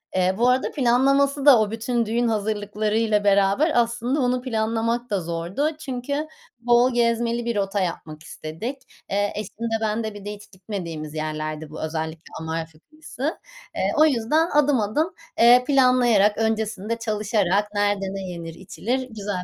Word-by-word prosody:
Eee, 185 0 +2
bu 240 +2 +3
arada 255 +1 +1
planlaması 275 +2 +2
da 275 -5 +8
o 215 -1 0
bütün 230 +1 -1
düğün 235 +2 0
hazırlıklarıyla 210 0 0
beraber 200 - +3
aslında 240 +3 +1
onu 250 0 +1
planlamak 230 0 -1
da 200 -3 0
zordu. 170 - -2
Çünkü 280 +2 -3 0.3
bol 240 +1 +3
gezmeli 235 0 +1
bir 235 -1 -1
rota 200 0 -1
yapmak 155 -4 -4
istedik. 165 - -6 0.3
Eee, 205 +1 0
eşim 210 -1 -6
de 225 - 0
ben 220 +1 -1
de. 220 -1 -4
Bir 205 -1 -11
de 205 - -4
hiç 205 0 -14
gitmediğimiz 175 -6 -6
yerlerdi 155 0 -4
bu 155 - -8
özellikle 160 0 -5
Amalfi 160 -1 -5
kıyısı. 310 - -6 0.4
Eee, - - 0
o 310 - +7
yüzden 305 +4 +2
adım 290 -4 +3
adım, 260 - 0 0.3
eee, 245 +1 +7
planlayarak 250 -7 +4
öncesinde 220 -1 -1
çalışarak 210 -3 0
nerede 205 -1 +1
ne 195 - -4
yenir, 170 -2 -7
içilir 240 +8 -3
güzel 205 -4 -4
220 Hz, 155 wpm, -23 LUFS, 195-245 Hz, 0.4 s, da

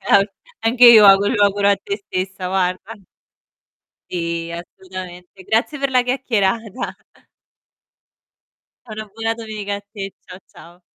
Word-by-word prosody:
Al 200 +1 +4 0.3
anche 240 +2 +4
io 225 -3 +9
auguro 195 +2 +5
lo 205 -1 +4
auguro 200 0 +2
a 200 - +4
te 405 -1 -5
stessa 185 0 -4
guarda. 185 +3 -1 1.2
Sì 170 -1 -3
assolutamente. 180 +1 -10
Grazie 235 +9 -1
per 275 -1 0
la 250 -1 +3
chiacchierata. 230 -3 -1 1.9
E - - -8
una 215 0 -6
buona 225 0 -2
domenica 215 -3 -5
a - - -8
te. 200 -1 -8
Ciao, 180 - -11
ciao. 175 +2 -17
200 Hz, 130 wpm, -19 LUFS, 185-225 Hz, 1.9 s, io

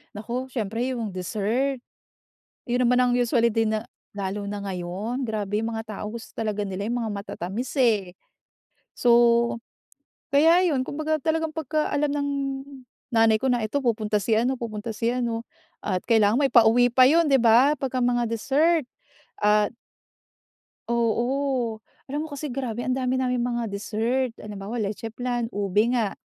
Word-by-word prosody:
Naku, 240 +5 -4
siyempre 235 0 -2
yung 225 -4 -3
dessert. 220 +8 -1 0.9
Yun 245 +1 +1
naman 250 +1 +3
ang 250 -1 +2
usually 235 -1 +2
din 220 -1 +1
na 215 +2 -4 0.3
lalo 200 +1 -3
na 205 0 -4
ngayon, 200 +7 -4
grabe 210 -2 -2
yung 225 +1 -2
mga 220 -2 -6
tao - - -5
gusto 225 +2 -7
talaga 215 -2 -1
nila 200 0 -4
yung 240 +1 -1
mga 220 - -2
matatamis 200 +3 -5
eh. 215 -9 +2 0.8
So, 245 - +2 1.2
kaya 325 +6 +5
yun, 260 -3 +1
kumbaga 310 +1 -1
talagang 320 +2 -1
pagka-alam 300 -1 -1
ng 285 0 -1 0.8
nanay 225 -1 +4
ko 265 +1 +1
na 240 -2 +1
ito 220 +7 -1
pupunta 220 -4 0
si 215 +2 +1
ano 245 +3 +1
pupunta 220 -1 -5
si 220 +2 -2
ano 235 -1 -1 0.3
at 185 -3 -2
kailangan 220 -2 +3
may 275 - +2
pauwi 240 +1 +5
pa 255 +1 +6
yun, 330 +5 +5
'di 275 -2 +4
ba? 240 +4 +5
'Pagka 260 -2 -1
mga 240 -1 +1
dessert, 285 +8 +2 0.6
ah 210 0 +4 1.2
Oo. 235 0 0 0.2
Alam 290 +3 -3
mo - - -6
kasi 285 +1 -5
grabe 245 -4 -4
ang 255 - +1
dami 260 0 0
naming 250 -2 0
mga 240 -1 -1
dessert. 225 +5 -1
Halimbawa 210 +2 -6
leche 215 +2 -3
flan, 240 0 -3
ube 205 +3 +1
nga, 230 -5 0
235 Hz, 155 wpm, -25 LUFS, 215-260 Hz, 1.2 s, pa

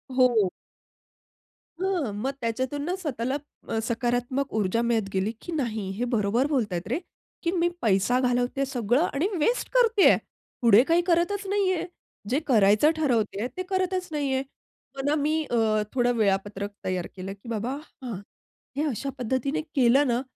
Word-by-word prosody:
हो. 240 -7 +4 1.3
हां. 360 - 0
मग 255 +7 -2
त्याच्यातून 260 +5 -2
ना, 355 +3 -1
स्वतःला 260 -5 -2 0.3
अ, 225 - 0
सकारात्मक 245 +3 -1
ऊर्जा 215 +1 +1
मिळत 230 -4 0
गेली, 195 +3 0
की 345 - -7
"नाही, 225 - -2
हे 245 - 0
बरोबर 225 +5 +2
बोलतायत 210 - -1
रे, 260 +9 -1 0.4
की 335 - +1
मी 345 -1 +2
पैसा 210 +4 +3
घालवतेय 250 +2 +1
सगळं 245 0 +1
आणि 295 +7 +1
वेस्ट 470 +11 +1
करतेय, 465 -5 +5 0.5
पुढे 230 0 +7
काही 335 +5 +3
करतच 365 +4 +1
नाहीये, 385 -3 +1 0.4
जे 265 +5 +2
करायचं 215 +3 +5
ठरवतेय 230 -7 0
ते 370 - -1
करतच 370 -1 0
नाहीये." 275 -3 0 0.5
पण 275 +1 -1
मी 310 +2 +1
अ, 240 - +1 0.4
थोडं 245 -1 +2
वेळापत्रक 200 0 0
तयार 185 -2 -1
केलं 190 +1 -6
की 200 +4 -13
बाबा, 230 +4 -2 0.3
हां. 235 -6 -4 0.6
हे 295 - +1
अशा 275 +1 -3
पद्धतीने 260 +6 -1
केलं 270 +2 +5
ना, 240 0 +1
250 Hz, 145 wpm, -26 LUFS, 220-300 Hz, 1.3 s, पुढे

